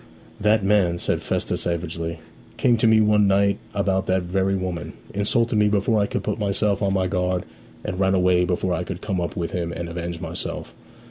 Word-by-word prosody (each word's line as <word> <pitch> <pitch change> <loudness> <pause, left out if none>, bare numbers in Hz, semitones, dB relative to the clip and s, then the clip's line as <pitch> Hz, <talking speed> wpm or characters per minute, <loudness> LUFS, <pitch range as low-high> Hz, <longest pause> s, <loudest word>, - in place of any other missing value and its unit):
'That 105 0 +3
man,' 95 -4 +3
said - - -1
Festus - - -2
savagely, 85 -1 -3 0.4
'came 120 -2 +4
to 115 0 +2
me 110 0 +6
one 105 -1 +4
night 100 +1 +3 0.2
about 95 -1 0
that 95 0 +1
very 95 +2 0
woman; 90 -5 -4 0.2
insulted 110 +3 +1
me 105 0 +4
before 105 +1 +2
I 100 - +1
could - - -3
put 105 +1 -2
myself 100 0 +1
on 100 -1 +1
my 95 -1 +1
guard, 90 -1 -1 0.4
and 90 - -4
ran 95 0 +3
away 90 -1 +3
before 90 0 0
I 90 - -1
could - - -6
come 95 -4 -2
up 85 - -3
with 85 -2 -2
him 85 -2 -2
and 85 0 -5
avenge 85 0 -5
myself. 85 0 -5
95 Hz, 200 wpm, -23 LUFS, 90-100 Hz, 0.4 s, me